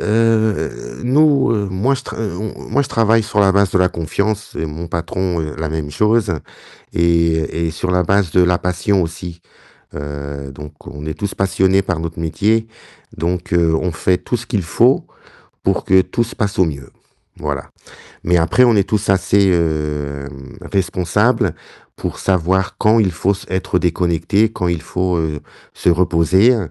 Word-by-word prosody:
heu, 110 - 0
nous, 140 +1 +4
heu, 105 -2 0
moi, 100 +9 +1
je 135 - -5
tr - - -8
heu, 110 -6 -3
on 110 - -4
on - - -14
moi 130 +6 +2
je 140 - -2
travaille 115 0 +3
sur 105 0 -4
la 100 -2 +5
base 100 -1 +3
de - - -1
la 90 -1 +3
confiance, 100 +6 -2
et - - -1
mon 80 +2 -6
patron 85 +1 -2 0.2
la 80 -1 -2
même 75 -2 -3
chose 105 +4 +2 0.6
et 85 -1 +1
et - - -1
sur 85 +3 -3
la 90 0 +2
base 95 0 +1
de 90 - +4
la 90 0 +3
passion 90 +2 0
aussi. 85 0 -6 0.5
Heu, 70 -1 -6
donc 75 +2 -10
on 75 +1 -8
est 80 - -3
tous 100 +1 -3
passionnés 95 0 +2
par 90 -4 -2
notre 85 0 -5
métier, 110 +7 +1 0.5
donc 85 +2 -2
heu, 85 -2 +3
on 90 +1 -1
fait 90 +3 +1
tout 110 +7 -3
ce 115 0 -5
qu'il 105 -7 -1
faut 120 +10 +3 0.6
pour - - 0
que 95 0 +5
tout 120 - -1
se 115 - -9
passe 105 -3 -2
au 90 - +4
mieux, 70 -4 -6 0.5
voilà. - - -4 0.5
Mais 90 +1 +2
après 85 +9 +3
on 120 -3 +5
est 95 -1 +2
tous 105 0 -1
assez 95 +1 +3
hem, 75 -5 -2
responsables 100 +2 +1 0.4
pour - - -5
savoir 95 0 0
quand 110 +2 +4
il 100 -4 +2
faut 90 +5 +1
s 100 - -10
être 95 0 0
déconnecté, 90 +5 +1
quand 90 - -2
il 85 -3 -1
faut, 90 +1 -1
heu, 75 -2 -2 0.3
se - - -1
reposer 90 +6 +3
90 Hz, 180 wpm, -18 LUFS, 80-105 Hz, 0.6 s, la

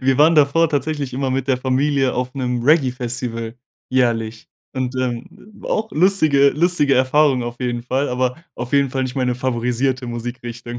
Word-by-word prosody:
Wir 130 +1 +1
waren 160 +3 +6
davor 150 +2 +4
tatsächlich 145 -2 -2
immer 130 +1 -2
mit 130 0 -1
der 130 -2 +2
Familie 135 +1 +1
auf 125 +1 -3
'nem 125 -2 -2
Reggae-Festival 125 -5 0 0.4
jährlich. 115 -3 0 0.3
Und, 130 0 -2
ähm, 125 -2 -2 0.3
war - - -9
auch 220 +1 -1
lustige 155 -6 +4
lustige 150 -3 +2
Erfahrungen 130 0 +3
auf 120 +1 -7
jeden 120 -1 -2
Fall, 135 +3 -1
aber 125 0 -1 0.2
auf 120 +1 -6
jeden 140 -2 +3
Fall 130 -1 -1
nicht 125 - -5
meine 125 -2 0
favorisierte 125 +1 -1
Musikrichtung. 120 0 -6
130 Hz, 165 wpm, -20 LUFS, 125-140 Hz, 0.4 s, waren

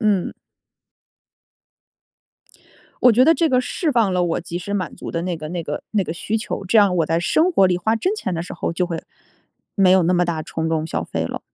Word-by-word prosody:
嗯。 205 -5 +1 2.7
我 250 - +8
觉 245 +4 +5
得 325 +2 +5
这 330 0 +1
个 255 -2 +3
释 310 +6 -2
放 225 -7 +2
了 180 -1 +1
我 170 -2 -1
及 170 0 -6
时 200 +3 -6
满 185 -4 -3
足 - - -7
的 165 - -2
那 180 -2 -2
个 155 -1 -7
那 175 0 -4
个 150 - -4
那 205 -3 +1
个 160 - -4
需 210 +6 -2
求， 210 -2 -5
这 205 +4 +3
样 200 -3 +4
我 165 - +3
在 165 +2 0
生 315 - +2
活 195 - +4
里 180 -1 +1
花 220 +6 0
真 370 - -1
钱 190 - -4
的 165 - -2
时 - - -8
候， 170 - -3
就 180 +1 -1
会 170 -2 -4 0.8
没 195 -3 +4
有 185 -1 +5
那 180 +2 +2
么 180 0 +3
大 170 -2 -2
冲 160 0 -3
动 160 -1 -1
消 80 - -3
费 80 0 -3
了。 - - -5
180 Hz, 250 characters per minute, -21 LUFS, 170-220 Hz, 2.7 s, 我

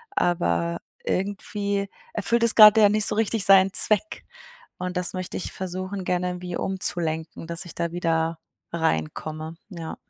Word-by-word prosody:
aber 85 - 0 0.3
irgendwie 200 +1 -3 0.2
erfüllt 230 +3 +1
es 230 - +5
gerade 215 0 +9
ja 205 - +6
nicht 210 0 +2
so - - +1
richtig 220 -1 0
seinen 195 -1 +5
Zweck. 220 +10 +4 0.5
Und 180 0 -4
das 180 -1 -1
möchte 185 -1 -5
ich - - -5
versuchen, 185 +1 -5
gerne 180 0 -1
irgendwie 180 0 -5
umzulenken, 165 -4 -2
dass 170 +2 -2
ich 175 - -10
da 170 -1 -3
wieder 165 -1 -1 0.3
reinkomme, 155 - -3
ja. 170 -5 -7
180 Hz, 150 wpm, -24 LUFS, 165-200 Hz, 0.5 s, gerade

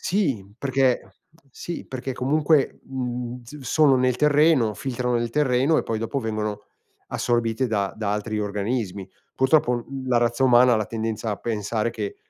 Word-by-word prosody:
sì 140 - 0
perché 130 -1 0 0.3
sì 170 +6 -6
perché 130 0 -5
comunque, 145 +2 +2
mhmm, 125 -1 -4
s 140 +6 -11
sono 140 +1 +3
nel 125 -1 +2
terreno, 150 -5 +4
filtrano 125 -1 -2
nel 120 0 -1
terreno 135 +2 +2
e - - 0
poi 115 - -2
dopo 115 +5 -2
vengono 105 -2 -3 0.4
assorbite 120 +1 0
da 100 -4 -1
da 105 -2 -1
altri 105 +1 -2
organismi. 100 -1 -3 0.3
Purtroppo, 130 -1 +3
uhm, 130 +2 -5
la 120 -1 +3
razza 120 +2 +1
umana 125 -1 +6
ha - - +3
la 110 -1 -1
tendenza 110 -1 -3
a 105 - -2
pensare 110 +1 -2
che, 405 - -5
125 Hz, 160 wpm, -24 LUFS, 110-135 Hz, 0.4 s, umana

